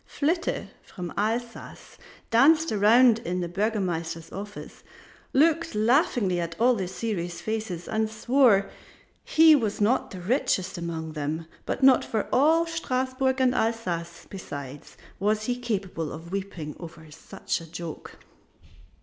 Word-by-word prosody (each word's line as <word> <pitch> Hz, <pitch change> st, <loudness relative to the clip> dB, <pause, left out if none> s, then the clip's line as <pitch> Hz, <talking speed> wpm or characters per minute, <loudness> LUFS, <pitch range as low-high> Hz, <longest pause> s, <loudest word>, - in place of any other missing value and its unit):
Flitte 335 Hz, +4 st, -1 dB
from 175 Hz, -2 st, -8 dB
Alsace 230 Hz, +3 st, -4 dB, 0.3 s
danced 310 Hz, +8 st, +5 dB
around 225 Hz, +3 st, +5 dB
in 180 Hz, -2 st, -3 dB
the 175 Hz, -, -2 dB
Burgomaster's 175 Hz, -4 st, -2 dB
office, 205 Hz, +2 st, -8 dB, 0.5 s
looked 325 Hz, -1 st, +2 dB
laughingly 220 Hz, -, +2 dB
at 170 Hz, +1 st, -5 dB
all 250 Hz, +2 st, +5 dB
the 190 Hz, -6 st, -2 dB
serious 185 Hz, -3 st, -4 dB
faces 215 Hz, -6 st, -4 dB
and 220 Hz, 0 st, 0 dB
swore 220 Hz, -2 st, +3 dB, 0.6 s
he 320 Hz, 0 st, +6 dB
was 220 Hz, -7 st, -1 dB
not 215 Hz, +5 st, +2 dB
the 185 Hz, -, -8 dB
richest 190 Hz, -2 st, 0 dB
among 165 Hz, -2 st, -5 dB
them, 155 Hz, +2 st, -4 dB, 0.2 s
but 265 Hz, -, -2 dB
not 265 Hz, -2 st, +6 dB
for 220 Hz, -2 st, -2 dB
all 315 Hz, +6 st, +4 dB
Strasburg 260 Hz, -4 st, -1 dB
and 255 Hz, -1 st, +3 dB
Alsace 180 Hz, -8 st, -2 dB
besides 145 Hz, -7 st, -9 dB, 0.2 s
was 210 Hz, +2 st, +1 dB
he 245 Hz, +2 st, -1 dB
capable 195 Hz, -10 st, -3 dB
of 165 Hz, +2 st, -9 dB
weeping 190 Hz, -6 st, -5 dB
over 160 Hz, -2 st, -11 dB
such 150 Hz, -, -5 dB
a 165 Hz, -, -12 dB
joke. 165 Hz, -1 st, -8 dB
210 Hz, 130 wpm, -26 LUFS, 170-250 Hz, 0.6 s, he